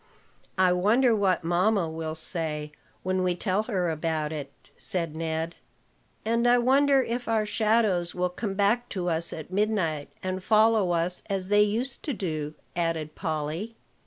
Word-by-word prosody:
"I 185 -1 +4
wonder 225 +7 +3
what 195 -4 +1
mamma 180 +2 +2
will 160 0 -4
say, 155 -2 -3 0.3
when 185 0 0
we 180 -1 +1
tell 190 +2 0
her 190 -7 -1
about 155 -1 -2
it," 145 -3 -5 0.2
said 165 -4 0
Ned. 160 +1 -2 0.7
"And 230 +2 +2
I 245 0 +6
wonder 270 +2 +4
if 240 +1 -3
our 220 -2 +1
shadows 210 -5 +1
will 180 0 0
come 195 +1 -4
back 210 +5 +1
to 180 -3 -2
us 165 0 0
at 160 +3 -8
midnight, 185 -8 0
and 185 0 -3
follow 215 -2 +4
us 175 +1 +1
as 190 -1 -1
they 205 0 +5
used 230 +5 0
to 290 - -3
do," 155 -7 -3 0.2
added 165 -3 -1
Polly. 160 +6 -3
185 Hz, 160 wpm, -27 LUFS, 165-215 Hz, 0.7 s, I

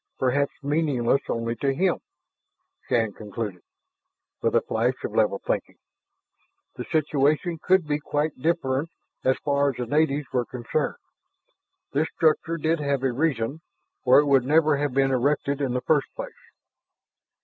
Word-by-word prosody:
Perhaps 140 +3 0
meaningless 140 -4 +1
only 115 0 -1
to 135 -1 0
him, 185 +3 +1 0.9
Shann 110 -3 +1
conceded, 105 -3 -6 0.8
with - - +1
a - - +5
flash - - 0
of - - -3
level - - +2
thinking. - - -2 1.0
The - - -6
situation 155 +2 +1
could 185 -2 +3
be 150 0 0
quite 150 +1 -1
different 150 -1 0 0.3
as 130 0 +2
far 140 -1 +2
as 135 - -4
the 125 - -3
natives 145 +2 +1
were 125 -2 +1
concerned. 125 +5 -2 1.0
This 150 +3 +1
structure 165 +1 +2
did 160 +1 0
have 140 -2 -1
a 135 - +2
reason, 140 0 -1 0.4
or 125 0 +6
it 150 - +3
would 135 -3 +4
never 155 +2 +3
have 145 -2 -1
been 135 0 +3
erected 140 +2 0
in 130 -3 -1
the 125 - 0
first 150 0 +2
place. - - -6
140 Hz, 150 wpm, -25 LUFS, 130-155 Hz, 1.0 s, or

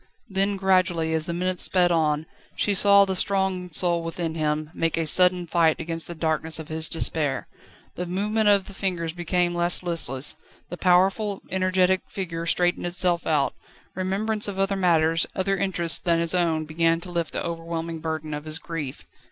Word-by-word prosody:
Then 195 +1 0
gradually, 185 -4 +2
as 160 0 -1
the 170 - -2
minutes 180 +1 -1
sped 180 -2 +3
on, 155 -2 +1 0.3
she 205 - +1
saw 200 0 +5
the 190 -1 -2
strong 190 -1 0
soul 170 +1 +1
within 165 0 -4
him 155 -1 -2
make 165 0 -1
a 165 - 0
sudden 180 +2 +5
fight 165 -2 +2
against 165 0 -3
the 170 - -7
darkness 160 0 -1
of 160 -1 -8
his 160 0 +1
despair: 150 -5 0 0.5
the 180 - -5
movement 210 +4 +1
of 200 -2 +4
the 200 - -11
fingers 175 -4 -2
became 175 0 0
less 175 +1 +1
listless; 145 -6 -4 0.3
the 175 - -5
powerful, 190 +3 +2
energetic 185 0 +2
figure 170 -3 -5
straightened 175 +1 +1
itself 175 -1 0
out; 150 -3 +1 0.4
remembrance 205 +4 -1
of 200 -2 -5
other 195 +1 +1
matters, 165 -3 +2
other 195 +1 0
interests 180 -4 0
than 170 -1 +1
his 165 +1 0
own 165 -3 +1
began 165 +1 +1
to 180 - -8
lift 170 -2 -2
the - - -3
overwhelming 165 -1 -4
burden 160 -1 -4
of 150 +1 -5
his 155 0 -1
grief. 155 -6 -6
175 Hz, 175 wpm, -24 LUFS, 160-185 Hz, 0.5 s, saw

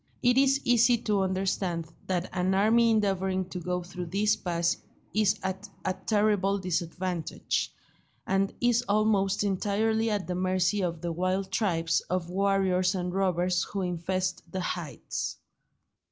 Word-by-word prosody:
It 245 0 +4
is 275 +1 +4
easy 240 0 +4
to 205 -2 +1
understand 185 -2 -1 0.2
that 180 -1 -1
an 185 +1 +1
army 225 +4 +4
endeavouring 190 -3 +1
to 180 - -5
go 180 +1 -2
through 180 0 -6
this 210 +4 +2
pass 170 -1 0 0.4
is 215 -1 +3
at 190 +2 -4 0.2
a 185 - +1
terrible 205 -1 +1
disadvantage, 180 -1 -2 0.5
and 195 +1 +1
is 240 0 +3
almost 205 -2 +2
entirely 215 +3 +1
at 205 -3 -1
the 180 - -3
mercy 185 +2 +1
of 170 -3 -2
the 170 - -2
wild 185 +3 -1
tribes 170 -5 +1
of 175 -1 -2
warriors 190 -1 +2
and 180 -1 -2
robbers 180 -2 +1
who 195 -2 -3
infest 185 +1 -2
the 185 - -2
heights. 175 -3 -4
190 Hz, 140 wpm, -28 LUFS, 180-205 Hz, 0.5 s, It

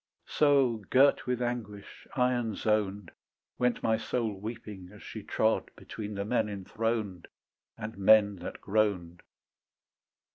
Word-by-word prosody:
So 140 -6 +3
girt 135 +1 +4
with 125 0 0
anguish, 110 -5 -5
iron 125 -4 +1
zoned, 105 -3 0 0.5
Went 125 -1 +1
my 110 0 +3
soul 115 -1 -2
weeping 105 -4 -7
as 105 - -14
she - - -7
trod - - 0
Between 105 -1 -7
the 100 0 -3
men 110 -1 +1
enthroned 105 -1 -3 0.5
And 105 -1 -7
men 105 0 +5
that - - -7
groaned. 95 -5 0
110 Hz, 120 wpm, -30 LUFS, 100-120 Hz, 0.5 s, men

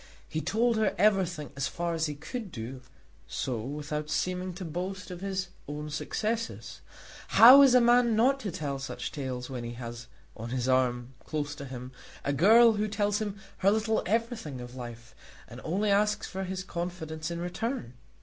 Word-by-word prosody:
He 155 - -3
told 230 +4 +1
her 215 -2 +1
everything 185 -6 +2
as 140 -1 -1
far 170 +4 -2
as 160 -1 0
he 150 - -4
could 205 - -6
do 125 +2 -6 0.5
so 125 -3 -2
without 150 +4 -4
seeming 185 0 -1
to 185 0 -6
boast 180 +3 -5
of 180 0 -7
his 190 -2 -2 0.2
own 150 +1 -5
successes. 225 +8 -3 0.6
How 255 +5 +11
is 265 -3 +7
a 250 - +7
man 240 -1 +5
not 260 +5 +3
to 210 -7 -4
tell 140 -4 -3
such 135 - -5
tales 130 -3 -4
when 125 -3 -5
he 120 0 -5
has 120 -1 -7 0.3
on 115 +2 -6
his 125 0 -1
arm, 125 -1 +1
close 145 -2 -3
to 140 -1 -8
him, 125 -1 -7 0.3
a 140 - +1
girl 225 - +7
who 210 0 0
tells 205 0 0
him 205 -2 -4 0.2
her 195 - +3
little 220 +1 +1
everything 225 - -1
of 125 0 -8
life, 120 -2 -9 0.3
and 120 +2 -10
only 200 +6 0
asks 210 +1 +2
for 190 0 -4
his 185 0 -4
confidence 170 -3 -4
in 170 0 -4
return? 180 - -3
175 Hz, 180 wpm, -29 LUFS, 135-210 Hz, 0.6 s, How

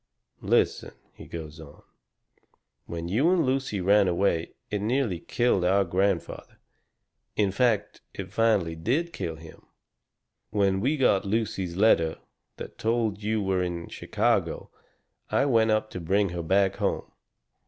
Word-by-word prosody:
"Listen," - - +1 0.2
he - - -12
goes 80 -2 -8
on. 75 -2 -13 1.0
"When 85 0 -5
you 120 - +2
and 180 -4 +3
Lucy 130 -5 -1
ran 100 +2 +4
away 85 -2 0 0.2
it 105 -1 -1
nearly 115 -5 0
killed 120 -1 +1
our 95 +2 +3
grandfather. 95 0 -1 0.8
In 100 -2 +2
fact, 115 0 0
it - - -8
finally 105 -8 +2
did 140 - -1
kill 80 - -4
him. 80 0 -13 0.9
When 100 -2 +1
we 140 +7 +1
got 115 -8 +3
Lucy's 100 -4 -2
letter 85 -6 +3 0.4
that - - -9
told 110 -2 0
you 105 0 -1
were 95 -1 0
in 85 -1 -4
Chicago - - -1 0.6
I - - +2
went 115 -5 +3
up 110 0 +1
to - - -5
bring 95 +4 +1
her 85 0 -4
back 95 +3 +2
home. - - -2
100 Hz, 140 wpm, -26 LUFS, 85-115 Hz, 1.0 s, ran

